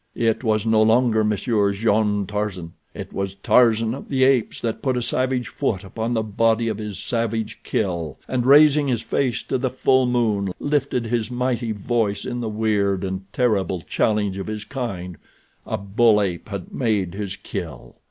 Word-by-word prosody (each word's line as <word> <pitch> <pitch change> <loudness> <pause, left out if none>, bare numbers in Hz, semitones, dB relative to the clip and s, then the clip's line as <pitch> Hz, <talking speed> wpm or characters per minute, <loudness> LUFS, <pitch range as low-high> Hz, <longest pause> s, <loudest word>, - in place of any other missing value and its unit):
It 115 0 0
was 110 -2 +1
no 110 -1 +3
longer 110 0 +3
Monsieur 105 -1 +1
Jean 105 -1 +1
Tarzan; 95 -4 -4 0.2
it - - -8
was 95 0 -3
Tarzan 115 +2 +3
of 135 - -8
the 130 -2 +2
Apes 130 -4 +2
that 115 -2 -3
put 130 -2 0
a - - +2
savage 130 -1 0
foot 110 -9 -2
upon 115 +4 -3
the 110 - +1
body 115 +2 +1
of 110 -1 -3
his 105 -2 -5
savage 115 -2 -2
kill, 85 -8 -2
and, 130 -2 -1
raising 145 +1 +6
his 120 -4 -1
face 125 -4 -1
to 130 - -2
the 130 0 0
full 130 0 +2
moon, 110 -6 0
lifted 140 -4 0
his 115 -1 -1
mighty 125 -2 -1
voice 105 0 -1
in 125 -1 -3
the 115 -2 -3
weird 105 -3 0
and 95 0 -5
terrible 100 -7 0
challenge 105 +1 0
of 95 - -5
his 110 0 -5
kind—a 110 - -7
bull 105 +2 +3
ape 95 -1 -2
had 100 -3 -6
made 105 -8 0
his 100 -1 -4
kill. - - -7
110 Hz, 170 wpm, -22 LUFS, 100-120 Hz, 0.2 s, raising